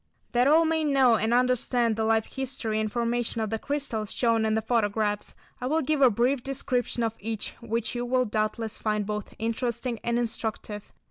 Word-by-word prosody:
That 245 +2 +3
all 320 +3 +6
may 320 0 +1
know 270 -5 +4
and 220 +1 0
understand 245 -1 +2
the 220 - -1
life 220 0 +2
history 255 -5 -2
and 215 -1 -1
formation 235 0 -1
of 220 -1 -2
the 225 - -1
crystals 275 -7 -3
shown 230 -2 +2
in 220 0 +1
the 220 - +1
photographs, 210 -2 0 0.3
I 250 - -1
will 315 +3 +1
give 300 +1 0
a 260 - +8
brief 245 +4 +1
description 250 -2 -1
of 225 -1 0
each 220 0 -4
which 230 0 -2
you 240 0 -2
will 255 +1 +1
doubtless 215 0 -2
find 210 -1 0
both 210 0 -5
interesting 235 +1 -2
and 235 0 0
instructive. 220 -3 -3
235 Hz, 190 wpm, -27 LUFS, 220-250 Hz, 0.3 s, a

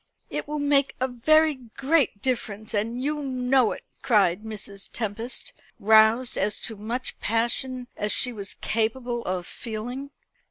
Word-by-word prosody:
"It - - -3
will 300 +1 -3
make 285 -1 +2
a 260 - +1
very 310 +6 +4
great 260 -1 0
difference; 225 -3 -2
and 230 +4 -1
you 295 +1 -1
know 255 -3 +2
it!" - - -6 0.2
cried 200 -5 +3
Mrs. 205 -2 -7
Tempest, 230 - -4 0.3
roused 220 +4 +5
to - - +1
as 210 - +1
much 225 +4 -5
passion 240 +3 0
as 210 0 +1
she 250 - +2
was 200 -3 -7
capable 235 +2 -1
of 180 -1 -2
feeling. 245 +7 -6
235 Hz, 145 wpm, -26 LUFS, 215-260 Hz, 0.3 s, roused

